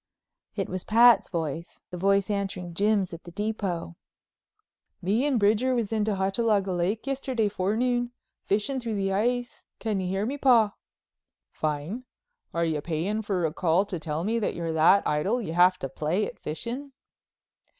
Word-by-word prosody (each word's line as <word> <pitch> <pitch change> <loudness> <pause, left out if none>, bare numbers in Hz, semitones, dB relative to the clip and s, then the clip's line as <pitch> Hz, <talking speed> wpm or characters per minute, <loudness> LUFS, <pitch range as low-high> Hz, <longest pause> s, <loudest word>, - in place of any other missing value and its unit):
It 195 -3 -2
was 185 0 -4
Pat's 230 -1 +6
voice, 165 -1 -4
the - - -5
voice 195 +2 +2
answering 195 -3 -3
Jim's 200 0 +1
at 170 - -8
the - - -10
Depot: 195 - -3 1.0
"Me 220 +10 +1
and 265 -5 +2
Bridger 220 +5 +3
was 230 -3 -1
in 215 -1 +1
to 215 -2 0
Hochalaga 195 +1 +1
Lake 190 +7 -1
yesterday 260 -5 0
forenoon, 240 +5 0 0.3
fishin' 215 +7 0
through 230 -3 -3
the 195 -1 0
ice. 240 +4 -1
Can 215 -3 -1
you 185 - -2
hear 195 +3 -1
me, 280 +5 -3
Paw?" 230 -6 +5 0.8
"Fine. 155 - -3 0.5
Are 170 0 0
you 155 -2 -1
payin' 175 +8 -2
for 195 -5 -1
a 155 - -1
call 175 +2 +2
to 185 -4 -5
tell 155 +1 -3
me 225 +4 0
you're 170 -4 -2
that 165 +5 +5
idle 190 +11 +1
you 165 -9 -4
have 180 +1 +5
to 135 - -4
play 155 +9 -1
at - - -8
fishin'?" 245 - -5
200 Hz, 165 wpm, -27 LUFS, 175-225 Hz, 1.0 s, Pat's